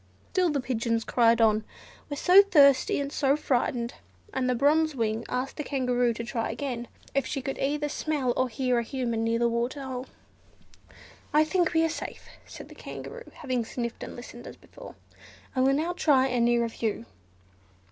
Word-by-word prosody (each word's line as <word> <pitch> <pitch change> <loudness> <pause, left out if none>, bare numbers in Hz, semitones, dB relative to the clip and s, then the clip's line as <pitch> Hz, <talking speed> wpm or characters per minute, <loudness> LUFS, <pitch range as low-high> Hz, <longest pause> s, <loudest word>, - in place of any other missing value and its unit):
Still 365 -2 +2
the 295 -2 0
pigeons 230 -3 -1
cried 230 -1 +3
on, 220 -1 +3 0.5
"we're 285 - -4
so 370 +5 +7
thirsty 280 -11 +4
and 280 0 -3
so 280 -2 +2
frightened;" 245 -4 -1 0.4
and 255 -1 0
the 250 - +2
Bronze 305 +4 +3
Wing 225 -2 -1
asked 255 +2 -3
the 300 - -3
Kangaroo 250 -4 +1
to 235 - -4
try 230 -1 -3
again, 245 -4 -4 0.3
if 275 - 0
she 280 - -2
could 270 +1 -5
either 295 +2 0
smell 290 -4 -1
or 255 0 +1
hear 250 +1 0
a - - -1
Human 235 -2 -2
near 230 0 +1
the 235 0 +2
water 240 +4 -2
hole. 260 -1 -5 1.3
"I 305 - +7
think 345 +2 +1
we 325 0 +4
are - - +3
safe," 325 - -6 0.2
said - - -10
the - - -11
Kangaroo, 480 0 -9
having 255 -5 -2
sniffed 235 +1 -5
and - - -7
listened 240 0 -10
as - - -9
before; - - -13 0.6
"I 255 - +2
will 270 +1 +4
now 320 +5 0
try 285 -7 +3
a 250 -1 0
nearer 235 0 +3
view." 220 - -3
255 Hz, 185 wpm, -27 LUFS, 235-290 Hz, 1.3 s, so